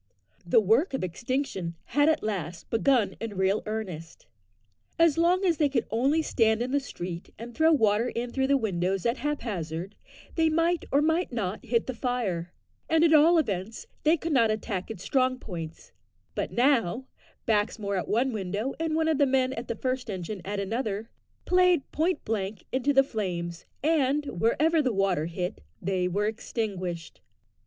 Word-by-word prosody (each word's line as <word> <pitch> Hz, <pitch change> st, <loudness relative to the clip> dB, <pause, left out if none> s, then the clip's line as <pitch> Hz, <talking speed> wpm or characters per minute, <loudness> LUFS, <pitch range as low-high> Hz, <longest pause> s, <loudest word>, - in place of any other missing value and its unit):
The 175 Hz, -, +4 dB
work 230 Hz, -, +2 dB
of 265 Hz, -, -3 dB
extinction 190 Hz, -, -3 dB
had 290 Hz, +2 st, +3 dB
at 315 Hz, -, +1 dB
last 180 Hz, -6 st, -4 dB
begun 235 Hz, -1 st, +2 dB
in 220 Hz, -4 st, -5 dB
real 190 Hz, +2 st, +2 dB
earnest. 185 Hz, -7 st, -5 dB, 0.7 s
As 330 Hz, -3 st, +5 dB
long 355 Hz, +3 st, +3 dB
as 340 Hz, -4 st, +2 dB
they 295 Hz, -1 st, +3 dB
could 260 Hz, -4 st, 0 dB
only 275 Hz, +8 st, +2 dB
stand 225 Hz, -4 st, +2 dB
in 255 Hz, -, -4 dB
the 285 Hz, -, +3 dB
street 175 Hz, -10 st, -7 dB
and 235 Hz, +2 st, -8 dB
throw 320 Hz, +5 st, +4 dB
water 225 Hz, -4 st, +3 dB
in 240 Hz, +1 st, -4 dB
through 265 Hz, +1 st, 0 dB
the 280 Hz, 0 st, +4 dB
windows 190 Hz, -5 st, -1 dB
at 235 Hz, +2 st, +1 dB
haphazard, 195 Hz, -, -3 dB, 0.4 s
they 320 Hz, -1 st, +3 dB
might 330 Hz, +1 st, +1 dB
or 285 Hz, +2 st, +4 dB
might 320 Hz, +2 st, +1 dB
not 210 Hz, -4 st, -3 dB
hit 235 Hz, -1 st, +1 dB
the 260 Hz, -, -3 dB
fire 220 Hz, -9 st, -2 dB, 0.4 s
and 320 Hz, 0 st, +4 dB
at 325 Hz, -1 st, +5 dB
all 320 Hz, +3 st, +6 dB
events 215 Hz, -, -2 dB, 0.2 s
they 315 Hz, +3 st, +4 dB
could 325 Hz, +1 st, -3 dB
not 230 Hz, -5 st, +4 dB
attack 215 Hz, -3 st, -3 dB
its 205 Hz, -5 st, -7 dB
strong 255 Hz, -1 st, +1 dB
points; 170 Hz, -9 st, -8 dB, 0.4 s
but -, -, -2 dB
now, 245 Hz, -3 st, +2 dB, 0.4 s
Baxmore 210 Hz, -2 st, 0 dB
at -, -, -5 dB
one 245 Hz, +4 st, +1 dB
window, 210 Hz, +5 st, -2 dB
and 325 Hz, -1 st, 0 dB
one 320 Hz, 0 st, +2 dB
of 315 Hz, -2 st, +1 dB
the 285 Hz, -, +5 dB
men 260 Hz, 0 st, +2 dB
of 235 Hz, -1 st, -6 dB
the 230 Hz, -, -2 dB
first 255 Hz, +1 st, -2 dB
engine 190 Hz, 0 st, -5 dB
at 200 Hz, +2 st, -3 dB
another, 215 Hz, +1 st, -3 dB, 0.3 s
played 360 Hz, -5 st, +3 dB
point 320 Hz, +2 st, 0 dB
blank 205 Hz, -3 st, -3 dB
into 265 Hz, +2 st, +1 dB
the 270 Hz, -1 st, +5 dB
flames, 175 Hz, -8 st, -4 dB, 0.2 s
and, 295 Hz, -2 st, +2 dB, 0.2 s
wherever 310 Hz, +8 st, +3 dB
the 260 Hz, -4 st, +1 dB
water 195 Hz, -6 st, +1 dB
hit, 175 Hz, -, -4 dB, 0.2 s
they 185 Hz, -1 st, 0 dB
were 200 Hz, +3 st, 0 dB
extinguished. 195 Hz, -6 st, -4 dB
230 Hz, 175 wpm, -27 LUFS, 195-285 Hz, 0.7 s, all